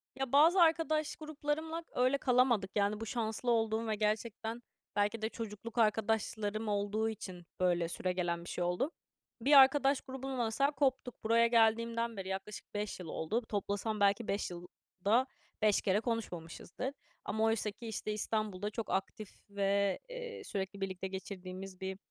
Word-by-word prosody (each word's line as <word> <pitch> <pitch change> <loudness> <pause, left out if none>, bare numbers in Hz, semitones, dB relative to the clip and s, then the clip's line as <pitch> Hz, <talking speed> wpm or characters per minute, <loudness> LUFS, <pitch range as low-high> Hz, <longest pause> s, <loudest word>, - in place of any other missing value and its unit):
Ya, 270 -2 -3
bazı 325 +6 +6
arkadaş 320 -2 +3
gruplarımla 310 +2 -3
öyle 255 +2 +2
kalamadık. 245 -7 +3
Yani, 205 0 +2
bu 225 - -4
şanslı 230 +1 -1
olduğum 225 0 +1
ve 215 - +1
gerçekten 220 +2 -1 0.3
belki 210 +2 +1
de 220 - 0
çocukluk 230 0 -7
arkadaşlarım 215 -1 +1
olduğu 205 +2 0
için 185 -5 -7
böyle 175 -2 +2
süregelen 175 -1 -1
bir - - -7
şey 175 - -2
oldu. 180 - 0 0.5
Bir 280 +6 +3
arkadaş 275 0 +7
grubundan 265 -2 -3
mesela 275 +6 +2
koptuk. 265 -3 -1
Buraya 230 +1 +5
geldiğimden 230 0 +2
beri 190 -1 -5
yaklaşık 195 +2 -6
5 205 -1 -3
yıl 180 - -7
oldu. 160 +9 -1
Toplasam 205 +1 -1
belki 200 +3 +3
5 200 -2 -1
yılda 190 +7 -1 0.3
5 210 -2 +4
kere 195 +1 +2
konuşmamışızdır. 225 +1 -4 0.3
Ama 220 +1 0
oysaki, 225 0 0
işte, 215 -1 -3
İstanbul'da 210 -2 -1
çok 220 +1 -5
aktif 195 +2 -2 0.2
ve, 200 -1 +1
eee, 480 -2 -6
sürekli 195 - -4
birlikte 190 -1 -3
geçirdiğimiz 190 0 -7
bir 190 0 -3
220 Hz, 145 wpm, -33 LUFS, 200-245 Hz, 0.5 s, arkadaş